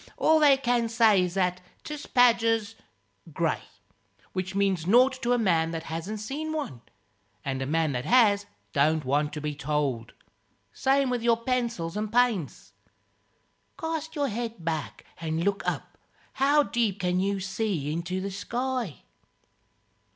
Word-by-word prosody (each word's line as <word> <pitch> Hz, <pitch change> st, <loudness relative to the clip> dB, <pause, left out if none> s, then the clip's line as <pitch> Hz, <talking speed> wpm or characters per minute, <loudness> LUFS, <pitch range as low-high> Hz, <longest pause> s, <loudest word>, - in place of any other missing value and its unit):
All 315 Hz, 0 st, +4 dB
they 285 Hz, -3 st, +6 dB
can 240 Hz, -3 st, +1 dB
say 225 Hz, -4 st, +4 dB
is 180 Hz, 0 st, -2 dB
that 180 Hz, -1 st, 0 dB, 0.2 s
'tis 300 Hz, -1 st, -7 dB
badger's 230 Hz, -3 st, +3 dB, 0.6 s
grey -, -, 0 dB, 0.7 s
which 185 Hz, 0 st, -3 dB
means 195 Hz, -4 st, +1 dB
nought 255 Hz, +5 st, +4 dB
to 240 Hz, -, 0 dB
a 245 Hz, -, +4 dB
man 170 Hz, -7 st, +2 dB
that 165 Hz, -1 st, -4 dB
hasn't 190 Hz, +7 st, -4 dB
seen 295 Hz, +9 st, -4 dB
one; 215 Hz, -, -4 dB, 0.6 s
and 135 Hz, -1 st, -2 dB
a 130 Hz, -, -2 dB
man 160 Hz, 0 st, +1 dB
that 125 Hz, -1 st, -3 dB
has 205 Hz, -5 st, +4 dB, 0.3 s
don't 155 Hz, +1 st, +2 dB
want 145 Hz, +3 st, +1 dB
to 150 Hz, -, -5 dB
be 150 Hz, 0 st, -2 dB
told. 145 Hz, -6 st, -2 dB, 0.6 s
Same 270 Hz, -1 st, +2 dB
with 245 Hz, -1 st, -1 dB
your 230 Hz, 0 st, +3 dB
pencils 235 Hz, -8 st, -2 dB
and 210 Hz, 0 st, -3 dB
paints. 230 Hz, -, 0 dB, 1.1 s
Cast 320 Hz, -1 st, -4 dB
your 285 Hz, -2 st, 0 dB
head 225 Hz, -5 st, -5 dB
back 160 Hz, -3 st, -3 dB
and 160 Hz, 0 st, -2 dB
look 200 Hz, +1 st, 0 dB
up -, -, -7 dB, 0.3 s
how 285 Hz, +2 st, +4 dB
deep 225 Hz, -7 st, -1 dB
can 180 Hz, 0 st, +1 dB
you 200 Hz, +1 st, 0 dB
see 190 Hz, -6 st, -2 dB
into 170 Hz, +3 st, -3 dB
the 195 Hz, +1 st, -4 dB
sky?" 240 Hz, -, -3 dB
200 Hz, 150 wpm, -27 LUFS, 165-245 Hz, 1.1 s, they